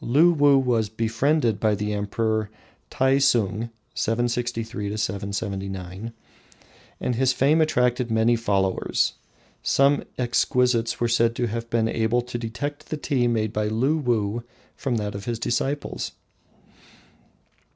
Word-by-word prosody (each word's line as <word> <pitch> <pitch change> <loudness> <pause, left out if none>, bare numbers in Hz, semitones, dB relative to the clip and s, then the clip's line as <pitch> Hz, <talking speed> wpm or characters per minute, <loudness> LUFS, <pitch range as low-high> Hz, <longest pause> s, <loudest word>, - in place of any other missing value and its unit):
Luwuh 145 +1 +5
was 120 -5 +1
befriended 115 +2 +1
by 110 -1 +2
the 105 +1 -2
Emperor 110 +1 -1 0.4
Taisung 125 -5 +2 0.2
(763 115 -2 -1
779), 100 0 -4 0.9
and 125 - -1
his 130 +1 +2
fame 145 +5 +3
attracted 125 -5 +1
many 115 +1 +3
followers. 100 -4 0 0.5
Some 140 +1 +3
exquisites 125 -1 +1
were 120 - +2
said 115 0 +2
to 120 - 0
have 115 +1 -4
been 115 -1 +1
able 115 +2 +1
to 120 0 -5
detect 145 +6 -5
the 155 - -2
tea 135 -5 0
made 110 -3 0
by 105 0 0
Luwuh 120 -3 0 0.3
from 130 -3 -2
that 105 -2 -2
of 100 0 -7
his 120 -1 -2
disciples. 135 +5 -2
115 Hz, 120 wpm, -24 LUFS, 110-125 Hz, 0.9 s, Luwuh